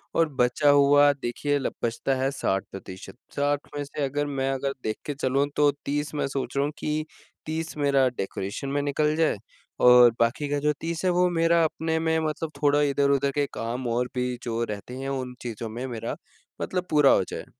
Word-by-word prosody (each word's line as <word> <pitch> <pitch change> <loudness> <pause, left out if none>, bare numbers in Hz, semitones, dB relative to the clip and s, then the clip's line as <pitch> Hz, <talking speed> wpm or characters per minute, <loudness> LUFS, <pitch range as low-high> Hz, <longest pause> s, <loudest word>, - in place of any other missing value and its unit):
और 165 -1 +3
बचा 125 +3 +3
हुआ 145 0 +6
देखिए 140 +2 -2 0.2
बचता 120 +3 0
है 130 +1 0
60 95 -8 -1
प्रतिशत, 95 +1 -9 0.2
60 145 0 0
में 145 - -2
से 145 0 -5
अगर 145 +2 -1
मैं 135 -2 -1
अगर 135 +1 -2
देख 110 0 -2
के 145 - -2
चलूँ 135 0 0
तो 145 -1 +4 0.2
30 145 +2 -2
मैं 145 - 0
सोच 135 0 -4
रहा 140 - +3
हूँ 150 - -2
कि 155 0 -2 0.4
30 160 0 -4
मेरा 140 -2 +3
डेकोरेशन 100 +7 -4
में 145 +1 0
निकल 150 +2 +1
जाए 160 -9 +2 0.4
और 125 -1 +8
बाकी 125 +5 +1
का 145 0 0
जो 150 +1 +1
30 165 0 -3
है 185 - +4
वो 180 +1 +3
मेरा 165 0 +3
अपने 160 0 -1
में 160 0 +1
मतलब 155 +1 -3
थोड़ा 145 0 +4
इधर-उधर 140 -1 +2
के 145 -1 +2
काम 120 +2 -3
और 120 +1 0
भी 125 -1 -1
जो 115 0 -2
रहते 105 +2 -6
हैं, 135 +1 -4
उन 130 -2 -3
चीज़ों 115 -1 -5
में 120 +4 -5
मेरा 115 -3 -4 0.5
मतलब 180 -1 -2
पूरा 150 -2 +5
हो - - +4
जाए। - - -6
140 Hz, 200 wpm, -26 LUFS, 125-150 Hz, 0.5 s, और